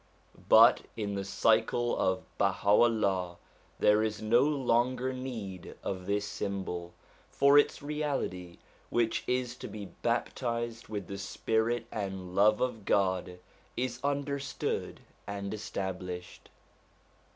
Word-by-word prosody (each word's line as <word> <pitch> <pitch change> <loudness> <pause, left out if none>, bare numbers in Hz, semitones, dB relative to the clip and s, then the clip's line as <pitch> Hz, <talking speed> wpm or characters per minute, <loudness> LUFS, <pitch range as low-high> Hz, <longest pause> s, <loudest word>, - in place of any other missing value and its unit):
But - - +8 0.2
in 105 -2 -2
the 100 0 -2
cycle 110 +4 +2
of 95 0 0 0.2
BahaVllah 100 -2 +2 0.4
there 105 +1 +4
is 110 -1 -1
no 110 +3 +4
longer 130 -2 +1
need 115 -8 -6
of 95 -2 -4
this 100 0 0
symbol; 95 -4 -4 0.3
for 140 +1 +4
its 145 - +1
reality, 140 - -3 0.3
which 115 -1 +1
is 125 -1 -1
to - - -7
be 105 -1 -7
baptized 115 +3 -2
with 105 -3 -4
the 100 +2 -6
Spirit 110 +3 0
and 95 -3 -4
Love 105 +2 +4
of 125 -4 -1
God, 95 -2 +1 0.4
is 125 0 -2
under 140 0 -1
stood 135 -1 -3 0.3
and 100 0 -4
established. 90 -4 -5
110 Hz, 120 wpm, -30 LUFS, 95-120 Hz, 0.4 s, But